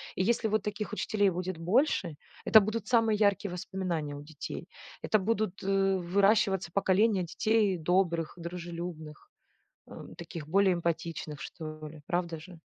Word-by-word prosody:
И 185 - +1
если 230 +1 +1
вот 215 -1 0
таких 210 0 -4
учителей 205 -1 +1
будет 180 0 -3
больше, 180 - +1 0.3
это 220 - +8
будут 215 +1 -2
самые 225 -3 +3
яркие 200 -2 +2
воспоминания 175 -5 -3
у 145 - -8
детей. 155 0 -7 0.4
Это 215 - +3
будут, 205 -1 -1
э, 195 0 +2
выращиваться 195 0 +2
поколения 200 0 +3
детей 210 +2 +1
добрых, 170 -1 +1
дружелюбных, 170 -2 -7 0.6
эм, - - -10
таких 165 -3 -8
более 195 +2 +4
эмпатичных 165 -3 -3
что 155 -1 -7
ли. 155 0 -11
Правда 175 -2 -1
же? 170 +2 -12
185 Hz, 140 wpm, -30 LUFS, 170-205 Hz, 0.6 s, это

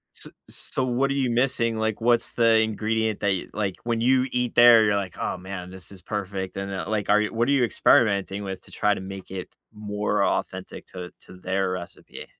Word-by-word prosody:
S - - 0 0.2
so, 130 - 0
what 130 +2 +1
are - - +1
you 135 -3 0
missing, 120 -2 +1
like, 110 0 -1
what's 120 0 +3
the 115 -1 +4
ingredient 110 0 0
that 100 - 0
y 95 - -1
like, 100 -3 -2
when 115 -1 -1
you 130 +1 +3
eat 125 -1 -1
there, 120 -2 +8
you're 105 -1 +2
like, 95 -2 -3
"Oh, - - -2
man, 90 -1 -7
this 95 0 -8
is 95 -2 -12
perfect," 95 -2 -4
and, 100 0 -4
then, 95 - -4
like, 105 -2 -2
are 105 +1 +5
you 105 - -2
what 115 +2 +1
are - - +2
you 135 -3 +3
experimenting 100 -3 +2
with 95 -1 -5
to - - -18
try 105 0 +1
to - - -6
make 95 0 -8
it 95 -1 -6 0.2
more 105 -1 -1
authentic - - -3
to 90 -1 -8
to - - -13
their 95 +1 -1
recipe? 90 -1 -8
105 Hz, 220 wpm, -25 LUFS, 95-115 Hz, 0.2 s, there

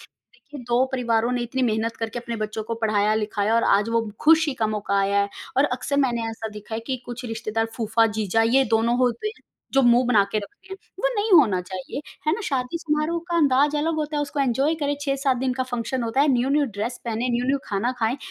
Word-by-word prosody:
देखिए 285 -2 -14
2 245 +2 +3
परिवारों 235 -2 +1
ने 245 -1 -1
इतनी 255 +2 -2
मेहनत 225 0 0
करके 225 +1 -4
अपने 235 -1 -5
बच्चों 215 0 -3
को 230 - -3
पढ़ाया-लिखाया 210 0 +1
और 230 - +3
आज 205 +3 +3
वो 230 -1 0
खुशी 315 -3 +4
का 225 -3 0
मौका 205 -2 -1
आया 200 +1 +2
है, 200 - -2 0.3
और 275 - +5
अक्सर 255 +1 -2
मैंने 235 -2 -2
ऐसा 225 0 -6
देखा 210 +2 -8
है 225 - -2
कि 260 -2 -1
कुछ 245 +1 -7
रिश्तेदार 225 -1 -2
फूफा-जीजा 225 -2 +1
ये 270 - +5
दोनों 230 +2 +2
होते 250 - 0
हैं - - -23 0.3
जो 270 - +4
मुँह 240 0 +5
बना 220 -5 +5
के 215 - +1
रखते 205 - -10
हैं, 385 - -5 0.2
वो - - +2
नहीं 415 +1 -1
होना 200 -8 +1
चाहिए, 185 +8 -6 0.3
है 310 - +3
ना 455 - -5
शादी 265 +1 -2
समारोह 315 +1 -1
का 340 - 0
अंदाज 290 0 +3
अलग 320 +2 0
होता 305 0 -2
है 295 - +1
उसको 285 0 -3
एन्जॉय 275 +4 +1
करें 285 0 +1
6-7 275 -2 0
दिन 255 +1 0
का 260 +1 -1
फंक्शन 245 +1 -2
होता 230 +4 0
है, 295 - +4
न्यू-न्यू 275 +4 +2
ड्रेस 225 +1 -4
पहने, 235 +1 -2
न्यू-न्यू 250 +3 +1
खाना 210 +5 -1
खाएँ, 225 +3 0
240 Hz, 220 wpm, -23 LUFS, 220-275 Hz, 0.3 s, और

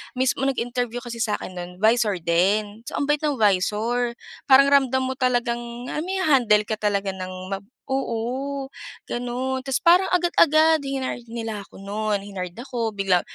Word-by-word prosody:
mismo 260 +1 +1
nag-interview 245 -2 -2
kasi 235 -1 -7
sakin 215 -4 -2
no'n, 175 0 -6
visor 215 +1 +3
din. 205 +5 +1
So - - -5
ang - - 0
bait 295 +1 +1
ng 295 -2 0
visor. 220 +4 +1 0.3
Parang 275 +1 +7
ramdam 265 -2 +3
mo 260 - -1
talagang, 245 -2 +1 0.3
ah, - - -2
maiha-handle 290 - +3
ka 215 0 -4
talaga 200 -2 0
ng 185 0 -7
ma 195 - -2 0.3
oo, 265 +2 -2 0.4
gano'n. 255 +2 -3
Tapos 270 -2 -1
parang 355 +3 +6
agad-agad 320 -2 +4
hinired 265 -3 -3
nila 225 -3 -5
ako - - -14
no'n, 205 0 -2
hinired 185 -3 -6
ako, 240 -3 -3
bigla 195 -3 +2
240 Hz, 155 wpm, -23 LUFS, 210-265 Hz, 0.4 s, Parang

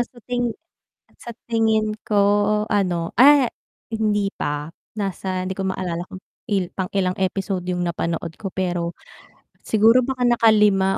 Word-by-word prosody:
sa 245 +1 -4
tingi 245 -1 -1 0.7
sa 235 - -9 0.2
tingin 220 -2 +1
ko - - -4 0.6
ano, 180 -5 0
ah 275 -1 +7 0.4
hindi 210 -3 0
pa, 150 -3 -4 0.2
nasa 190 -2 -3
hindi 185 +1 -4
ko 195 - -2
maalala 175 -2 -4
kung 185 0 -11 0.3
i 185 -3 0
pang 190 0 -3
ilang 185 -2 0
episode 190 -1 -2
yung 180 0 -2
napanood 170 -1 -2
ko 195 -3 -6
pero, 175 -2 -2 0.7
siguro 225 +3 +4
baka 255 0 -1
nakalima 210 -5 +4
195 Hz, 135 wpm, -22 LUFS, 180-220 Hz, 0.7 s, ah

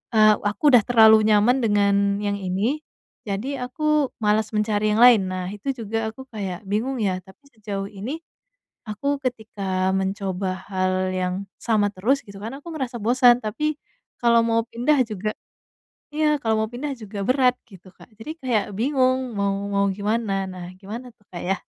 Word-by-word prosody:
eee, 215 -1 +7
aku 275 +8 +2
udah 245 - +9
terlalu 220 -2 +6
nyaman 220 +5 +4
dengan 200 -1 +2
yang 200 0 -1
ini, 195 +10 -1 0.5
jadi 220 +8 -3
aku 305 +1 0
malas 215 +1 +2
mencari 210 0 +1
yang 225 - +2
lain." 225 -7 +6
Nah, 185 -1 -3
itu 210 +7 -3
juga 225 -1 -3
aku 265 +4 -11
kayak 195 -3 -5
bingung 230 +7 -1
ya, 185 -2 0
tapi 190 +10 -19
sejauh 200 -3 -5
ini, 220 +10 -5 0.7
aku 280 +7 -2
ketika 195 -6 -2
mencoba 190 -1 -2
hal 185 0 0
yang 180 0 -1 0.3
sama 215 -3 +2
terus 255 +9 +1
gitu 200 -1 -11
kan 225 +3 -5
aku 290 - -12
merasa 260 -5 -4
bosan, 245 +2 +5
tapi 300 +8 -1 0.4
kalau 235 -1 +5
mau 230 0 +2
pindah 245 +6 +1
juga 215 -1 -3 0.8
iya 300 -1 +2
kalau 225 -1 +1
mau - - -5
pindah 280 +4 -4
juga 210 -3 -7
berat 255 -1 +4 0.2
gitu, 190 -2 -15
Kak. - - -17
Jadi 265 +8 -6
kayak 240 -6 +1
bingung 255 -1 +1
mau 200 0 +1 0.2
mau 200 0 +2
gimana, 200 -1 -1
nah 180 -1 -8
gimana 230 +6 -8
tuh, 205 - -32
Kak, 175 - -7
yah? 195 0 0
215 Hz, 165 wpm, -23 LUFS, 200-250 Hz, 0.8 s, udah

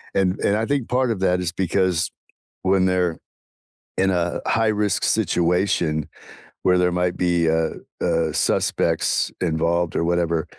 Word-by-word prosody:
and 95 -1 +3 0.2
and 100 - +2
I 110 - 0
think 140 -2 -1
part 125 0 +1
of 110 - -2
that 90 -1 +1
is 90 -2 -2
because 90 -2 0 0.5
when 95 0 +3
they're 90 -3 0 0.8
in 95 0 +2
a 85 -2 -1
high 115 0 +2
risk 105 -2 0
situation 85 -3 +1 0.6
where 90 0 +4
there 90 0 +2
might 90 0 0
be, 85 -2 +1
uh 80 0 0 0.3
uh, 80 -2 +1
suspects - - +1
involved 85 0 0
or - - +1
whatever, 85 -1 0
90 Hz, 145 wpm, -22 LUFS, 85-95 Hz, 0.8 s, where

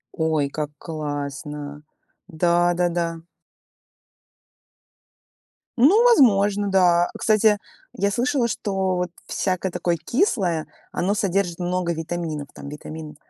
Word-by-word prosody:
Ой, 160 -3 +1
как 150 +1 -3
классно. 145 -1 -5 0.4
Да-да-да. 175 -1 +1 2.6
Ну 370 - +6
возможно, 205 - +4
да. 175 -2 +4
Кстати, 215 -1 +3 0.3
я 200 -4 0
слышала, 245 +4 +1
что 195 -4 -1
вот 180 -1 -2 0.2
всякое 185 -1 -1
такое 170 0 0
кислое, 180 - 0 0.3
оно 195 +3 0
содержит 195 -4 0
много 180 -1 -1
витаминов, 160 -2 -4
там - - -10
витамин 150 +1 -8
175 Hz, 95 wpm, -23 LUFS, 160-200 Hz, 2.6 s, Ну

